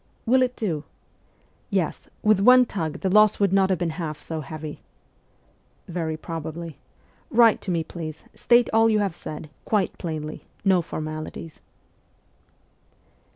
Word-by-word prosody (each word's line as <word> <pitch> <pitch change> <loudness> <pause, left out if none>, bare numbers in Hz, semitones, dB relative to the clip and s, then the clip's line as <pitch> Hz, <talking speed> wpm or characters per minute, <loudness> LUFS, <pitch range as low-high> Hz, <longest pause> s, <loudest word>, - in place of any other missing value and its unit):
'Will 255 +3 +4
it 250 -1 +1
do?' 165 -9 -2 0.9
'Yes, - - -2
with 215 -2 +4
one 250 +4 +7
tug 165 -9 -4
the 190 - 0
loss 215 +1 +5
would 200 -2 +2
not 195 -1 +4
have 190 - +2
been 170 -2 -1
half 155 -2 -4
so 160 -1 -5
heavy.' 155 0 -7 0.6
' - - -37 0.2
Very 165 -3 -3
probably. 160 -1 -6 0.5
Write 230 -1 +5
to - - -6
me, 170 -2 +1
please; 160 -1 -7
state 240 0 +4
all 225 0 +5
you 215 - +3
have 200 -4 0
said, 155 -1 -8
quite 205 -4 0
plainly; 155 -2 -5 0.2
no 190 -2 +4
formalities.' 155 0 -6
175 Hz, 145 wpm, -24 LUFS, 155-210 Hz, 0.9 s, one